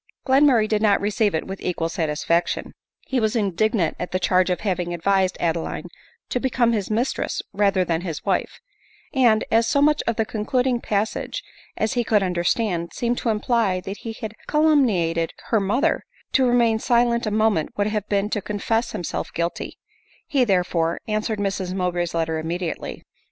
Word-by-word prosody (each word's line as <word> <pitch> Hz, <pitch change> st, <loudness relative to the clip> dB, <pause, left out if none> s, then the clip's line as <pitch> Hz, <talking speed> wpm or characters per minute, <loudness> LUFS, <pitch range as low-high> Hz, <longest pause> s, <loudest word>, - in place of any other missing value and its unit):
Glenmurray 265 Hz, -5 st, +4 dB
did 215 Hz, -1 st, 0 dB
not 205 Hz, -2 st, +4 dB
receive 205 Hz, -1 st, +1 dB
it 160 Hz, -, -2 dB
with 195 Hz, 0 st, -7 dB
equal 170 Hz, -2 st, -1 dB
satisfaction. 165 Hz, 0 st, -1 dB, 0.3 s
He 260 Hz, -, -1 dB
was 220 Hz, 0 st, 0 dB
indignant 205 Hz, -3 st, +1 dB
at 180 Hz, -, -4 dB
the 185 Hz, -, +1 dB
charge 185 Hz, 0 st, +2 dB
of 180 Hz, -, -1 dB
having 180 Hz, -4 st, -1 dB
advised 190 Hz, +1 st, +1 dB
Ade 170 Hz, -1 st, +1 dB
line 165 Hz, -, -5 dB, 0.4 s
to 250 Hz, -, 0 dB
become 245 Hz, -2 st, +2 dB
his 205 Hz, -4 st, -1 dB
mistress 230 Hz, +5 st, -1 dB
rather 195 Hz, -2 st, +2 dB
than 165 Hz, -1 st, 0 dB
his 165 Hz, -5 st, -5 dB
wife; 195 Hz, -3 st, -1 dB, 0.5 s
and 235 Hz, -6 st, +4 dB
as 230 Hz, +1 st, +4 dB
so 280 Hz, -, +2 dB
much 300 Hz, +1 st, +4 dB
of 230 Hz, -, +1 dB
the 225 Hz, -, 0 dB
concluding 245 Hz, +3 st, 0 dB
passage 215 Hz, -, -2 dB, 0.3 s
as 220 Hz, +3 st, 0 dB
he 245 Hz, -2 st, +1 dB
could 210 Hz, -3 st, +2 dB
under 180 Hz, -2 st, -1 dB
stand 175 Hz, -4 st, 0 dB
seemed 240 Hz, 0 st, -1 dB
to 235 Hz, -, -1 dB
imply 215 Hz, -3 st, +1 dB
that 195 Hz, +2 st, -6 dB
he 225 Hz, -, -6 dB
had 220 Hz, -1 st, -6 dB
calumniated 220 Hz, -, +2 dB, 0.2 s
her 225 Hz, -, +3 dB
mo 205 Hz, +5 st, 0 dB
ther, 325 Hz, +3 st, +2 dB, 0.3 s
to 260 Hz, -2 st, +3 dB
remain 235 Hz, -2 st, +3 dB
silent 235 Hz, 0 st, +2 dB
a -, -, +2 dB
moment 215 Hz, -7 st, +1 dB
would 205 Hz, -, +2 dB
have 210 Hz, -1 st, -2 dB
been 200 Hz, 0 st, +1 dB
to 210 Hz, -, 0 dB
confess 225 Hz, +4 st, -1 dB
himself 175 Hz, -, -4 dB
guilty; 170 Hz, +1 st, -3 dB, 0.5 s
he, 275 Hz, -3 st, +2 dB
therefore, 180 Hz, -5 st, +1 dB
answered 215 Hz, +1 st, -1 dB
Mrs 195 Hz, -2 st, -2 dB
Mowbray's 175 Hz, -2 st, -1 dB
letter 160 Hz, -1 st, 0 dB
immediately. 165 Hz, +1 st, -4 dB
210 Hz, 180 wpm, -23 LUFS, 180-230 Hz, 0.5 s, Glenmurray